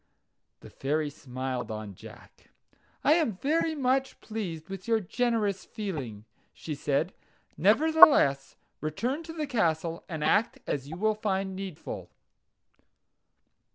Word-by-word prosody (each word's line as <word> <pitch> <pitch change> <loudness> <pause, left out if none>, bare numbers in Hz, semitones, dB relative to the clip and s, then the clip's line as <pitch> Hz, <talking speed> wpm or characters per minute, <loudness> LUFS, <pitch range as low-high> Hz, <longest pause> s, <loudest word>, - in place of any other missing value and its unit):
The - - -12
Fairy 150 +2 -1
smiled 130 -3 -4
on 110 -2 -5
Jack. - - -15 0.5
"I 295 - +6
am 310 - +1
very 315 - +1
much 265 -1 0
pleased 185 -8 -5
with 195 0 -7
your 225 -1 +3
generous 215 -1 0
feeling," 135 - -5 0.3
she 155 - -6
said. 145 +4 0 0.4
"Nevertheless, 220 - +6 0.2
return 235 - -2
to 325 0 -8
the 310 -2 -2
castle, 170 - 0
and 160 -3 -3
act 225 - +2
as 140 -1 -3
you 160 - -6
will 215 +3 +2
find 195 -2 -2
needful." 190 -4 -6
190 Hz, 120 wpm, -29 LUFS, 150-240 Hz, 0.5 s, I